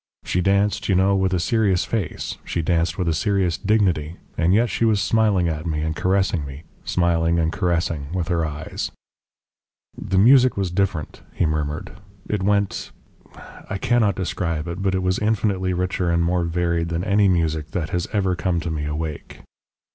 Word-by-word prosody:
She 90 - 0
danced, 100 +2 +1
you 95 - +3
know, 95 +2 +3
with 95 -1 +1
a 90 - +1
serious 100 -1 +1
face; 105 -9 -3
she 85 - -2
danced 85 +1 0
with 90 - -1
a 80 - +2
serious 95 -1 +1
dignity, 90 -7 +1 0.2
and 85 - +2
yet 115 +5 +4
she - - -1
was 110 -3 +3
smiling 100 -3 +2
at 80 0 -3
me 75 -2 -1
and 80 0 -2
caressing 95 -2 +1
me 70 +2 -8 0.2
smiling 85 -1 +1
and 80 -1 +1
caressing 85 -6 -1
with 90 -2 -2
her 85 -2 +1
eyes. 75 0 -4 1.0
"The 95 - -2
music 125 +4 +6
was 95 -3 -1
different," 90 -5 -2
he - - +1
murmured. 75 -1 -2 0.4
"It 105 -2 -1
went 100 0 0 0.8
I - - -2
cannot 110 -2 +2
describe 85 -3 -2
it; 85 +3 -5
but 95 -1 +1
it 95 - -1
was 90 0 +1
infinitely 100 -3 0
richer 90 0 -1
and 85 0 +2
more 85 0 +1
varied 85 0 0
than 85 +1 -2
any 100 0 +3
music 80 -4 0
that 80 -4 -3
has 90 -1 -1
ever 95 -3 +1
come 85 +1 0
to 85 0 -3
me 75 -2 -3
awake. 75 0 -5
90 Hz, 180 wpm, -22 LUFS, 80-100 Hz, 1.0 s, music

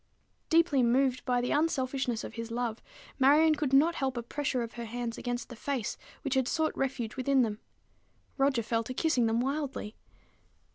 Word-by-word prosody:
Deeply 325 -5 +4
moved 255 +2 +2
by 250 -1 +2
the 245 - -1
unselfishness 265 -6 0
of - - -7
his 230 -1 -5
love, 235 -1 -3 0.4
Marion 300 +4 +6
could 295 -3 -1
not 295 +5 +5
help 265 -5 -2
a 235 - -2
pressure 260 0 -2
of 230 - -7
her 235 -1 -6
hands 235 0 -4
against 245 -1 -4
the 240 - -8
face 250 -1 -3 0.3
which 275 -3 -1
had 265 -2 +2
sought 315 +2 0
refuge 255 -5 -2
within 265 0 +3
them. 215 -2 -2 0.8
Roger 270 -4 +2
fell 230 +1 0
to 255 +3 -6
kissing 260 -8 +2
them 225 +1 +1
wildly. 270 -5 -3
255 Hz, 180 wpm, -30 LUFS, 235-280 Hz, 0.8 s, Marion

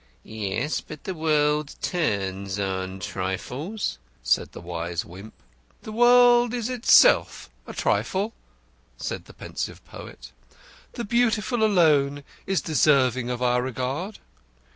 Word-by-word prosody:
"Yes, 110 +7 -3
but 155 -1 -11
the 190 - -4
world 150 -2 +1
turns 100 - -2
on 95 -1 -3
trifles," 105 - -4 0.2
said - - +1
the - - -10
wise 85 0 -4
Wimp. 95 +5 -12 0.5
"The 215 - -7
world 240 +1 +5
is 240 -1 -2
itself 255 - +4 0.2
a - - -7
trifle," 200 +4 0 0.6
said - - -5
the - - -15
pensive - - -6
poet. - - -11 0.6
"The 240 - -4
Beautiful 230 0 +1
alone 150 -8 +3 0.2
is 195 -1 +1
deserving 130 -5 +2
of 125 0 -3
our 125 0 +2
regard." 130 - -4
145 Hz, 120 wpm, -25 LUFS, -, 0.6 s, world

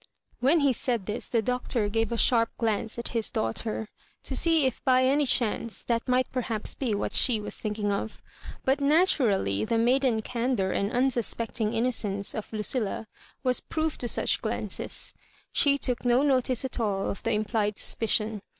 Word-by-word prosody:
When 290 +6 +3
he 280 -2 +3
said 235 -3 -2
this 210 +3 -3
the 230 -2 +1
Doctor 250 -2 -1
gave 225 +2 0
a 235 - -1
sharp 230 -1 +3
glance 225 0 -1
at 235 - -3
his 230 -2 -1
daughter, 215 - -2 0.4
to - - -4
see 325 -4 +4
if 260 - -2
by 255 -1 +4
any 280 +2 +3
chance 230 -2 0
that 230 0 -1
might 255 0 +2
perhaps 230 -4 -2
be 240 -6 -1
what 200 - -2
she 235 -4 +5
was 210 - -6
thinking 210 -1 -2
of; 200 +2 -3 0.5
but 270 +2 +2
naturally 275 - +3
the 230 +1 0
maiden 240 -1 +2
candour 235 -6 -1
and 200 - 0
unsuspectmg 235 -3 0
innocence 220 -4 0
of 215 - -6
Lucilla 220 0 -2 0.4
was 255 -1 +1
proof 315 -1 -2
to 245 - -3
such - - 0
glances. - - -3 0.4
She 280 -1 +3
took 250 -3 -1
no 245 +2 +3
notice 260 -3 +1
at 260 - -3
all 200 -4 0
of - - -8
the - - 0
implied 210 -1 0
suspicion. 220 -1 0
235 Hz, 170 wpm, -27 LUFS, 215-255 Hz, 0.5 s, she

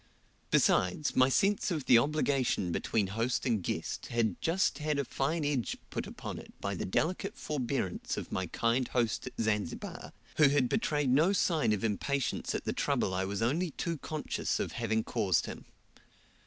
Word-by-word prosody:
Besides, 90 +12 +2
my 130 0 +5
sense 200 +10 +2
of 155 -7 -2
the 120 - +7
obligation 135 - +1
between 105 +5 0
host 115 +6 -1
and 115 -6 +1
guest - - -3
had 115 -5 0
just 175 +2 +1
had 150 -1 0
a 140 - 0
fine 150 +6 -1
edge 140 -5 -1
put - - -3
upon - - -6
it - - -12
by 100 - -2
the 95 - -3
delicate 185 - -1
forbearance 130 -9 -2
of - - -5
my 95 -1 -1
kind 120 +7 +1
host 120 -1 0
at 125 - -6
Zanzibar, 105 -5 -2 0.3
who 150 -3 +7
had 140 -3 +3
betrayed 150 - +1
no 160 +9 +4
sign 160 - +2
of 105 0 0
impatience 125 +5 -1
at - - -3
the - - -1
trouble 95 - 0
I 95 +1 0
was 100 +3 -2
only 165 +10 +1
too 165 +1 -3
conscious 155 +1 -2
of - - -2
having 110 +1 0
caused 100 -8 +1
him. - - -8
130 Hz, 175 wpm, -31 LUFS, 110-150 Hz, 0.3 s, the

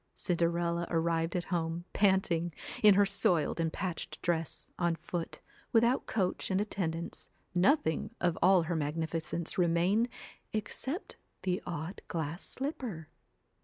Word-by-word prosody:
Cinderella 170 -1 +1
arrived 165 0 +1
at 175 - 0
home, 165 0 -1
panting, 190 -4 +2 0.3
in 210 -2 +8
her 205 +1 +6
soiled 175 -6 +1
and 165 -1 +1
patched 180 -1 -4
dress, 165 -2 0
on 170 -2 +2
foot, 170 0 -5 0.3
without 235 +3 +3
coach 185 -4 0
and 190 0 +2
attendance, 170 -5 -3 0.2
nothing 180 - +3
of 175 -2 +2
all 185 -1 +6
her 170 +1 -2
magnificence 160 +2 -2
remained 180 +7 +3 0.4
except 260 - -3 0.3
the 185 -1 0
odd 170 +2 -4
glass 160 +1 -3
slipper. 250 - -2
175 Hz, 125 wpm, -32 LUFS, 165-195 Hz, 0.4 s, in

